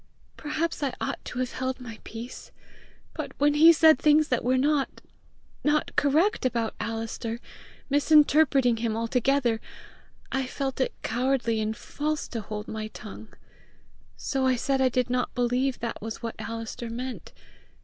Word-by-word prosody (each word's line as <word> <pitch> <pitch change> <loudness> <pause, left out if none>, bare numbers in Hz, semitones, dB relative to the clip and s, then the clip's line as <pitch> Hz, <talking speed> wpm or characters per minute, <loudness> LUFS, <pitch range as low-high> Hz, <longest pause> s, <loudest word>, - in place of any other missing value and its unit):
Perhaps 310 +2 -2
I 275 -3 -1
ought - - -3
to - - -6
have 255 -1 -1
held 260 0 -3
my 230 -3 -9
peace, 235 +3 -8 0.6
but - - -6
when 290 +1 +4
he 320 +3 +8
said 315 -1 +6
things 305 0 +4
that 250 - +1
were 255 +2 +2
not 285 +1 +1 0.6
not 295 +1 +1
correct 315 +9 +3
about 235 -3 0
Alister, 225 0 -4 0.5
misinterpreting 285 -3 +4
him 225 -1 -1
altogether, 240 0 +1 0.7
I 265 -1 -1
felt 270 0 -3
it - - 0
cowardly 240 -1 0
and 215 0 -2
false 300 +1 -3
to 230 - -4
hold 210 +1 -6
my 215 0 -4
tongue. 215 0 -10 0.9
So 270 -2 -1
I 255 - +3
said 270 +2 0
I 260 - +4
did 250 0 0
not 250 0 -1
believe 250 +2 +1
that 235 -1 -4
was 225 +2 -6
what 230 - -3
Alister 230 +1 -5
meant. 250 +2 -6
255 Hz, 150 wpm, -27 LUFS, 230-285 Hz, 0.9 s, he